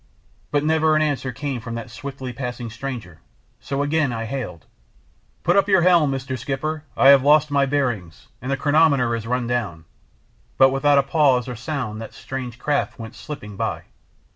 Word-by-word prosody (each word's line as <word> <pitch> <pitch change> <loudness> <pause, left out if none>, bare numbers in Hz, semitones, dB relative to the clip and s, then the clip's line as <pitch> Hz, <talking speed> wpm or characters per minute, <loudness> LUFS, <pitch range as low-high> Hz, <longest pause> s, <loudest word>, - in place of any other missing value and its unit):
But 145 -1 +1
never 160 0 +3
an 155 - +3
answer 140 -3 -1
came 135 -1 -4
from 115 0 -6
that 115 -1 -7
swiftly 130 +2 -7
passing 120 -2 -5
stranger, 115 - -7 0.4
so 140 0 -2
again 145 -2 +1
I 115 -1 -3
hailed 110 - -5 0.8
"Put - - +3
up 200 0 +3
your 190 -3 +5
helm, 170 -5 +4
Mr. 130 -1 -4
Skipper; 145 +4 -3
I 135 - +7
have 140 -1 +8
lost 150 +2 +4
my 140 -1 +3
bearings, 120 - -2 0.2
and 125 - -5
the 135 - 0
chronometer 145 -5 +3
has 115 -1 -4
run 125 0 0
down," 110 -10 -3 0.7
but 135 0 +6
without 140 +1 +3
a 140 - +5
pause 135 -4 +2
or 125 - -5
sound 120 -3 -4
that 115 - -9
strange 125 -3 -6
craft 145 +3 -1
went 115 -2 -8
slipping 105 -9 -8
by. - - -3
135 Hz, 180 wpm, -22 LUFS, 120-145 Hz, 0.8 s, have